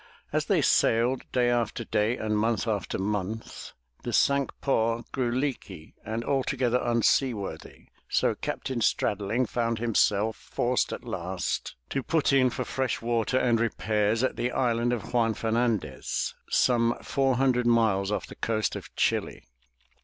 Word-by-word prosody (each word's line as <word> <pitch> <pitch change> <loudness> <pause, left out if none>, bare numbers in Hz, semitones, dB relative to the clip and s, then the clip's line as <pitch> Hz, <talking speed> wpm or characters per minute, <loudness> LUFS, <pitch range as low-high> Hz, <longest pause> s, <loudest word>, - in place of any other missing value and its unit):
As - - +1
they - - +2
sailed 120 +3 +2
day 125 -1 +2
after 120 -1 -1
day 110 +2 0
and 110 -1 -1
month 115 +2 0
after 105 -4 -1
month, 105 +2 -4 0.3
the - - -4
Cinque 140 -1 +3
Ports 115 -3 0
grew 125 -2 -1
leaky 120 - -4
and 110 +2 -4
altogether 130 -2 +1
unseaworthy, 115 - 0 0.2
so - - +2
Captain 130 -3 -4
Straddling 105 +3 +1
found 115 0 -1
himself 110 -1 +2
forced - - -1
at - - -6
last - - -3 0.2
to 135 - 0
put 155 +1 +1
in 130 -2 +5
for - - -4
fresh 130 -3 -1
water 115 +1 0
and 120 -3 +2
repairs 110 0 0
at 130 - 0
the 125 - -1
island 120 -1 +1
of 120 -2 -4
Juan 115 -2 +2
Fernandez, 110 - -1 0.2
some 120 -1 +2
four 135 -2 +1
hundred 125 -2 +2
miles 110 -4 +2
off 105 - -2
the - - -11
coast 110 -1 -1
of - - -9
Chili. - - 0
115 Hz, 145 wpm, -27 LUFS, 110-125 Hz, 0.3 s, in